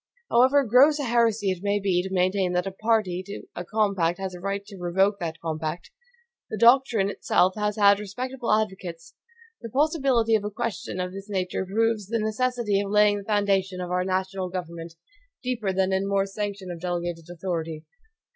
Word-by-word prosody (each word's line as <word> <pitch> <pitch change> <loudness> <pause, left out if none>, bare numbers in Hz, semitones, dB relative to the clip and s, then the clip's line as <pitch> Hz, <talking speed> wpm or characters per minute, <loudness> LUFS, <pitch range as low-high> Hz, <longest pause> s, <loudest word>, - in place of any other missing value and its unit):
However 260 +4 +5
gross 265 +6 +5
a 290 - -2
heresy 230 -5 +2
it 185 -2 -4
may 205 +1 +1
be 190 -3 +1
to 190 +1 -6
maintain 185 0 +1
that 180 +1 0
a 195 - -3
PARTY 215 -3 0
to 200 - -7
a 175 - -4
COMPACT 195 -4 0
has 190 -1 -4
a 180 - -8
right 200 +2 -3
to 205 -1 -11
revoke 190 +3 +1
that 165 -2 -4
COMPACT, 160 - -4 0.6
the 215 - -4
doctrine 235 -3 +5
itself 185 -1 +2
has 210 -1 -1
had 200 -1 +5
respectable 245 +5 -4
advocates. 190 -6 -2 0.5
The 230 - -7
possibility 270 -4 +2
of 215 -2 +3
a 210 - -2
question 210 -4 -4
of 180 0 -2
this 195 +2 -9
nature 190 -1 -2
proves 220 0 0
the 230 +2 -1
necessity 220 -1 0
of 200 - -4
laying 210 0 +4
the - - -9
foundations 195 -3 0
of 180 - -6
our 180 0 +1
national 190 0 -2
government 170 -2 -6 0.5
deeper 235 -6 -1
than 190 0 +1
in 190 +1 +1
the - - -3
mere 195 -1 +2
sanction 200 -2 -5
of 170 -2 -8
delegated 175 -2 -3
authority. 165 -3 -4
195 Hz, 185 wpm, -25 LUFS, 180-220 Hz, 0.6 s, However